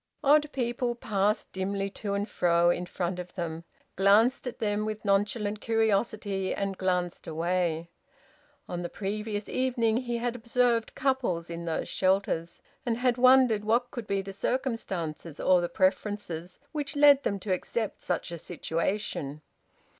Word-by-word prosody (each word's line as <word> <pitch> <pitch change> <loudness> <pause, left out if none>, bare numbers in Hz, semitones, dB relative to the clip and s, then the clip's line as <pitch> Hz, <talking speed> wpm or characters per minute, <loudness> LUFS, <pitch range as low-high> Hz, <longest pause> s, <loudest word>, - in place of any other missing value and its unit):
Odd 295 +1 +5
people 240 -1 -1
passed 210 -2 0
dimly 195 +1 -2
to 200 0 -3
and 200 +1 -1
fro 175 -3 +3
in 175 0 -2
front 180 0 -3
of 180 0 -8
them, 165 -2 -4 0.3
glanced 220 +8 +4
at 245 - -5
them 210 -1 0
with 215 0 -4
nonchalant 205 +1 +1
curiosity, 210 -3 0
and 195 -1 -2
glanced 180 -2 -1
away. 170 0 0 0.8
On 175 0 -4
the 175 - -4
previous 210 +1 -3
evening 240 -3 +1
he 240 -1 -2
had 240 0 -2
observed 235 -1 +1
couples 240 -12 0
in 170 0 -5
those 165 -1 -2
shelters, 185 -3 0 0.2
and 235 -3 0
had 245 0 +2
wondered 255 -4 +5
what 235 +3 +1
could 235 -4 -6
be 195 -1 0
the 195 0 -7
circumstances 190 - -3
or 185 -1 +4
the 175 - -2
preferences 185 -2 -1
which 295 -1 -4
led 285 -1 +7
them 200 -6 -1
to 190 0 -1
accept 215 +4 -3
such - - -2
a 170 - -5
situation. 165 -3 -3
205 Hz, 150 wpm, -28 LUFS, 180-235 Hz, 0.8 s, led